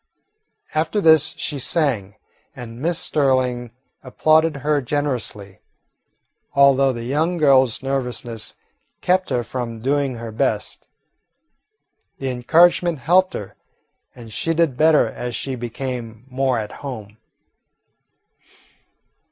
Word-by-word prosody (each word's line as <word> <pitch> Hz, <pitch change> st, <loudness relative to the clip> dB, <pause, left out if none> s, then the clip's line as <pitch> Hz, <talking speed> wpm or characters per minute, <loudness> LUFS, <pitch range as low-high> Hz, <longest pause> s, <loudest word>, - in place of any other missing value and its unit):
After 160 Hz, +7 st, 0 dB
this 160 Hz, -4 st, +4 dB
she 145 Hz, -, -3 dB
sang, 125 Hz, -, 0 dB, 0.4 s
and 120 Hz, 0 st, -9 dB
Miss 170 Hz, +2 st, 0 dB
Sterling 130 Hz, -5 st, 0 dB, 0.3 s
applauded 155 Hz, +4 st, +2 dB
her 150 Hz, -1 st, +2 dB
generously, 120 Hz, -8 st, -3 dB, 1.0 s
although 140 Hz, -1 st, +5 dB
the 120 Hz, -2 st, -6 dB
young 155 Hz, +8 st, 0 dB
girl's 135 Hz, -6 st, +3 dB
nervousness 125 Hz, -4 st, -3 dB, 0.5 s
kept 185 Hz, +1 st, +1 dB
her 120 Hz, -, 0 dB
from 115 Hz, -2 st, -5 dB
doing 135 Hz, +1 st, 0 dB
her 115 Hz, -1 st, -7 dB
best. 110 Hz, -, -2 dB, 1.3 s
The 135 Hz, -, -3 dB
encouragement 170 Hz, +6 st, +3 dB
helped 180 Hz, +8 st, +2 dB
her, 100 Hz, -, -7 dB, 0.6 s
and 115 Hz, -3 st, -11 dB
she 165 Hz, +8 st, -1 dB
did 160 Hz, -5 st, +2 dB
better 155 Hz, +2 st, +4 dB
as 120 Hz, -1 st, -5 dB
she 135 Hz, +3 st, -4 dB
became 120 Hz, -1 st, -6 dB
more 130 Hz, -1 st, 0 dB
at 110 Hz, -2 st, -4 dB
home. 110 Hz, -7 st, -8 dB
135 Hz, 110 wpm, -21 LUFS, 120-155 Hz, 1.3 s, although